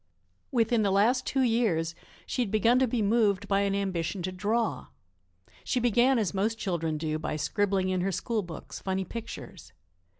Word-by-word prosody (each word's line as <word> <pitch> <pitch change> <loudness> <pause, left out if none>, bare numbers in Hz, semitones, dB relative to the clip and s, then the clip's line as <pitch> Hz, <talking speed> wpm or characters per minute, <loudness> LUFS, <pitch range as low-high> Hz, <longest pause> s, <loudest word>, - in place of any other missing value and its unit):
Within 235 -2 +2
the 205 - +2
last 220 +7 +2
two 265 -1 +1
years 215 -9 +1 0.3
she - - -2
had 235 - 0
begun 225 +4 +3
to 260 - +3
be 225 -2 0
moved 205 -2 +2
by 195 0 +2
an 200 0 +1
ambition 185 -2 -2
to 185 - -2
draw. 215 +5 -1 0.8
She 250 - 0
began 245 +2 +3
as 210 -5 0
most 215 +4 0
children 165 -6 -2
do 155 0 -2
by 155 - -3
scribbling 195 +3 0
in 185 -1 0
her 195 +2 0
school 220 +4 -1
books, 175 -4 -8
funny 190 0 -2
pictures. 230 +4 -8
200 Hz, 175 wpm, -28 LUFS, 185-230 Hz, 0.8 s, begun